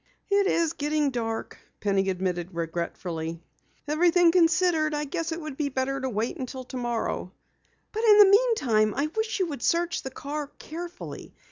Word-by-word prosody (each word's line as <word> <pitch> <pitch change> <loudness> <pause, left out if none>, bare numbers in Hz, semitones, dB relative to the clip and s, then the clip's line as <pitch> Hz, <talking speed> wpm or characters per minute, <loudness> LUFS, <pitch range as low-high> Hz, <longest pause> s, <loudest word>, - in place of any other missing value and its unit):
"It 400 0 +4
is 335 -5 +1
getting 295 -1 0
dark," 225 -2 -4 0.2
Penny 195 -2 +1
admitted 180 -1 -2
regretfully. 165 0 -4 0.5
"Everything 340 +3 +4
considered, 335 -3 +3
I 295 0 -1
guess 330 +4 -3
it 325 - -3
would 305 -4 -7
be 295 -2 0
better 270 +1 -2
to 260 - -1
wait 220 0 -2
until 260 0 -5
tomorrow. 240 -7 -3 0.6
But 440 +1 -3
in 425 -2 +7
the 415 - +10
meantime, 290 - +3
I 300 +2 0
wish 440 0 -1
you 375 - +2
would 285 -5 -6
search 340 0 +1
the 265 - -5
car 290 +2 -5
carefully. 345 +2 -8
290 Hz, 160 wpm, -26 LUFS, 225-340 Hz, 0.6 s, the